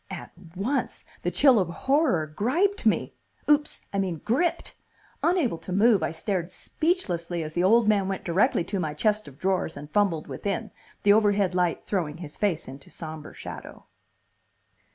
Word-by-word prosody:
At - - -7 0.2
once 235 +10 -2 0.2
the - - 0
chill 265 -6 +5
of 185 - +1
horror 265 - +1
griped 285 - 0
me. - - +1 0.3
Oops, 295 0 +2
I 200 - 0
mean 180 -5 -1
gripped!! 280 +11 0 0.5
Unable 325 - +1
to - - -8
move, 205 +1 +4
I 160 - 0
stared 175 +1 -2
speechlessly 180 - -1
as 155 0 -6
the 175 - +1
old 225 +4 +5
man 200 -3 +3
went 195 -1 -3
directly 175 0 +2
to 195 +3 -3
my 155 -4 -2
chest 210 +4 +1
of 140 -1 -12
drawers 185 -1 -1
and 150 +1 -9
fumbled 185 -6 +1
within, 200 -3 -4 0.3
the 205 - +6
overhead 205 -3 +3
light 180 -2 0
throwing 165 -6 -2
his 160 -4 -8
face 185 -6 -1
into 135 +1 -11
sombre 155 -2 -8
shadow. - - -9
195 Hz, 165 wpm, -26 LUFS, 165-225 Hz, 0.5 s, the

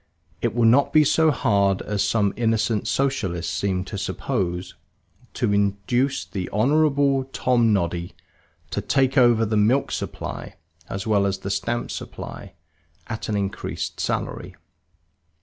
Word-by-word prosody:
It 120 -1 -1
will 120 -1 +3
not 125 +5 +5
be 155 - +6
so 160 +2 +3
hard 100 -8 +2
as 105 -1 -1
some 105 -3 +1
innocent 110 -2 0
Socialists 95 - -1
seem 95 -1 -1
to 100 - -5
suppose 95 -4 -2 0.6
to 100 - +1
induce 100 +7 0
the 95 -3 -5
Honorable 140 +3 +2
Tomnoddy 105 -10 +1 0.6
to - - -1
take 135 -1 +1
over 120 -4 +5
the 110 0 0
milk 115 +7 +2
supply - - -5 0.3
as 95 0 -4
well 100 -2 +2
as 100 - -1
the 100 - -5
stamp 120 +3 -2
supply - - -8 0.5
at 110 -1 -5
an 105 - 0
increased 100 -1 -4
salary. - - -3
110 Hz, 130 wpm, -23 LUFS, 100-130 Hz, 0.6 s, be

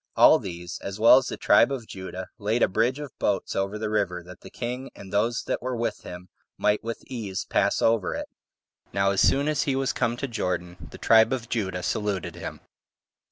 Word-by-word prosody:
All - - +7
these, 85 -1 -7
as 100 +1 -6
well 115 +4 +8
as 130 - -6
the - - -4
tribe 115 +5 +5
of 130 -4 -4
Judah, 95 -2 -7
laid 110 +3 +1
a - - +5
bridge 115 +7 +1
[of 145 -2 -7
boats] 100 -2 0
over 100 +2 -1
the 110 0 -3
river, 100 -5 -1
that 90 +1 -13
the - - -11
king, 125 +2 -5
and 95 0 -11
those 115 +4 +1
that - - -2
were 125 0 -3
with 115 0 -2
him, 90 +1 -9 0.3
might 105 0 +1
with 115 0 -5
ease 105 -7 -4
pass - - +1
over 115 -5 +2
it. - - -5 0.7
Now 100 0 +2
as 100 - +1
soon 140 +2 +3
as 155 -2 +1
he 135 - 0
was 135 0 0
come 115 +1 0
to 135 - -3
Jordan, 90 -6 -3
the - - -11
tribe 110 +1 +5
of 120 -3 -3
Judah 95 -6 -2
saluted 95 -1 -2
him. - - -7
105 Hz, 210 wpm, -26 LUFS, 95-120 Hz, 0.7 s, well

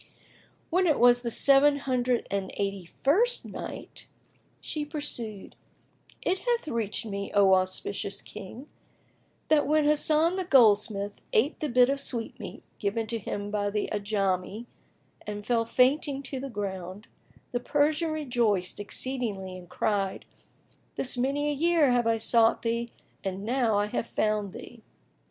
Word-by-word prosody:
When 365 +2 +3
it 310 - +2
was 245 0 +5
the 240 - -3
Seven 280 +4 +5
Hundred 255 -3 0
and 200 -1 -2
Eighty 195 -2 -3
first 405 - +1
Night, - - -8 0.5
She 300 - -4
pursued, 245 - -4 0.7
It 375 +1 0
hath 475 -5 -1
reached 230 -4 -2
me, 200 -2 -4
O 195 -1 +6
auspicious 190 +1 -1
King, 215 +7 -10 0.8
that 305 -2 +3
when 305 0 +3
Hasan 310 +4 +3
the 375 - -1
goldsmith 210 - +3
ate 265 +9 +2
the 305 - -2
bit 250 0 +5
of 275 +1 -1
sweetmeat 240 -4 -3 0.2
given 215 +2 -1
to 230 +1 -2
him 205 0 -5
by 205 -1 0
the 210 0 -2
Ajami 200 0 -1 0.6
and 205 0 -5
fell 230 0 +1
fainting 275 +3 +2
to 265 -1 -5
the 275 +1 -5
ground, 195 -2 -5 0.5
the 245 - -1
Persian 300 +5 +1
rejoiced 240 -13 0
exceedingly 205 -4 -2
and 180 -1 -12
cried, 195 -2 -1 0.7
"This 260 - +2
many 275 +4 0
a 295 - +1
year 320 -2 +3
have 240 -1 +2
I 225 0 +2
sought 225 0 +3
thee 235 0 -1 0.3
and 195 0 -4
now 235 -3 +1
I 205 - +2
have 225 +2 -3
found 210 -2 -1
thee!" 235 -2 -11
235 Hz, 145 wpm, -27 LUFS, 205-280 Hz, 0.8 s, O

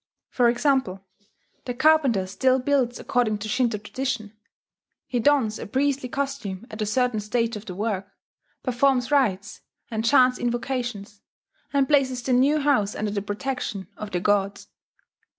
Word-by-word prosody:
For 245 -2 +3
example, 240 -7 0 0.6
the 245 - -4
carpenter 275 -9 +3
still 255 +8 +2
builds 260 -2 +1
according 230 -4 0
to 210 +1 -6
Shinto 240 -1 +1
tradition: 220 0 -4 0.7
he 245 - -2
dons 235 -4 +2
a - - -6
priestly 265 +2 0
costume 270 -8 -4
at 215 - -7
a 210 - 0
certain 245 0 +1
stage 230 +2 -1
of 210 +1 -9
the 180 - -6
work, 200 -1 -2 0.6
performs 255 0 +1
rites, 215 -8 +1 0.3
and 220 -1 -2
chants 250 +1 +4
invocations, 240 -4 -3 0.5
and 275 -2 +2
places 260 -4 +2
the 255 - 0
new 270 +5 +4
house 265 -9 +1
under 210 -1 -2
the 200 -1 -2
protection 205 -2 -4
of 215 - -7
the 180 - -1
gods. 200 0 0
240 Hz, 150 wpm, -24 LUFS, 210-265 Hz, 0.7 s, chants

